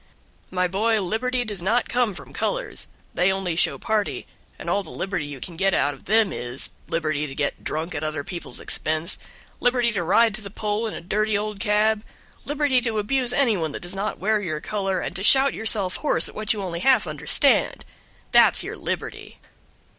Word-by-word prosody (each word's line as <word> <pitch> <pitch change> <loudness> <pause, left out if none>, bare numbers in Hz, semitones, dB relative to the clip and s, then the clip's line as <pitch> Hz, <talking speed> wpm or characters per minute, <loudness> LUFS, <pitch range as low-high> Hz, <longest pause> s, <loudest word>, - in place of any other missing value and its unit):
"My 180 0 +1
boy, 215 +4 +1
Liberty 245 +6 -1
does 205 -5 -4
not 225 +6 +1
come 240 -5 0
from - - -10
colors, - - -2 0.3
they 180 +2 +3
only 190 -3 -2
show 170 - +3
party, 220 -2 -1 0.3
and - - -9
all 200 - +1
the - - -10
liberty 185 -6 -3
you 145 -2 -8
can 170 +6 -6
get 195 0 +2
out 145 +1 +2
of 135 - -16
them 215 -2 +3
is, 120 +2 -2 0.2
liberty 155 -2 -1
to 135 - -8
get 145 -2 -2
drunk 160 +3 -3
at 145 - -4
other 155 -2 -2
people's 175 -1 -7
expense, 155 +4 -2 0.4
liberty 245 -1 +2
to 200 -5 -1
ride 210 +6 +4
to 215 - -4
the 200 - -8
poll 210 +2 -2
in 215 - -5
a - - -6
dirty 210 +4 0
old 210 -1 -4
cab, 215 0 +2 0.4
liberty 285 -3 +2
to 230 -3 -1
abuse 245 +4 +1
any 250 -4 +3
one 160 -5 -2
that - - -6
does 175 +1 -5
not 195 +2 -3
wear 215 +2 +1
your 155 -6 -3
color, 195 0 -2
and - - -5
to - - -5
shout 270 +6 +6
yourself 210 -4 +2
hoarse 300 - +2
at - - -8
what 215 -1 -1
you 210 -3 -1
only 170 -2 -4
half 265 +7 +4
understand - - +3 0.5
that's - - +5
your - - -5
liberty!" - - -5
205 Hz, 200 wpm, -24 LUFS, 175-225 Hz, 0.5 s, shout